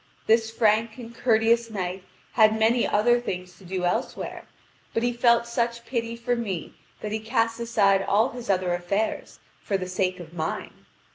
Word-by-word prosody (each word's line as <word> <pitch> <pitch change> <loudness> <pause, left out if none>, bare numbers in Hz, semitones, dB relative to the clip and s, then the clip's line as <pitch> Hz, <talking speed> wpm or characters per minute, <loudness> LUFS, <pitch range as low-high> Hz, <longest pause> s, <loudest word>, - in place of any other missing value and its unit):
This 225 0 +3
frank 220 0 +2
and 235 -2 -9
courteous 230 0 +2
knight 185 -3 -4 0.3
had 220 -1 +4
many 230 +2 +3
other 240 +4 +3
things 180 -5 -5
to - - -16
do 185 0 -3
elsewhere; 175 - -3 0.5
but 225 - +1
he 245 0 +1
felt 235 -1 +4
such 235 0 -2
pity 230 -2 -2
for 240 +1 -1
me 200 -8 -4 0.3
that 210 - -4
he 220 - -1
cast 225 0 0
aside 205 -4 +3
all 215 +6 +2
his 240 -3 -9
other 185 -2 +1
affairs 195 +5 -2 0.2
for 200 - -1
the 185 -1 -5
sake 185 0 -1
of 170 -1 -10
mine. 160 -2 -3
220 Hz, 170 wpm, -25 LUFS, 190-235 Hz, 0.5 s, had